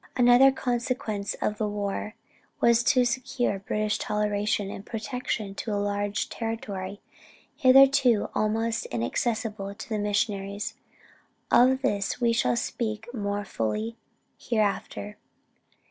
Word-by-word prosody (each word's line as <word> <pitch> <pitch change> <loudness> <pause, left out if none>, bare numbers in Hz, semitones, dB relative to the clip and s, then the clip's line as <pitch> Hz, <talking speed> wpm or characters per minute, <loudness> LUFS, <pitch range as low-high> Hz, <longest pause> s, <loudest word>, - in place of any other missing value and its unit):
Another 245 +2 +7
consequence 240 -5 -2
of 210 - -1
the 215 - +1
war, 205 +1 -3 0.4
was 235 0 +4
to 255 -3 +4
secure 245 -3 -1
British 210 +2 -1
toleration 210 -1 0
and 195 - -7
protection 225 -2 -4
to 215 +2 -5
a 205 - 0
large 205 0 -1
territory, 205 -4 -5 0.5
hitherto 265 -4 +5
almost 225 +2 0
inaccessible 200 - -2
to 220 +5 -9
the 215 -2 -1
missionaries. 205 -1 -1 0.8
Of 260 +2 +5
this 200 -1 0
we 235 -2 +3
shall 235 - +2
speak 225 0 -3
more 205 -2 -2
fully 215 - -2 0.4
hereafter. 210 -2 -2
215 Hz, 115 wpm, -27 LUFS, 205-240 Hz, 0.8 s, Another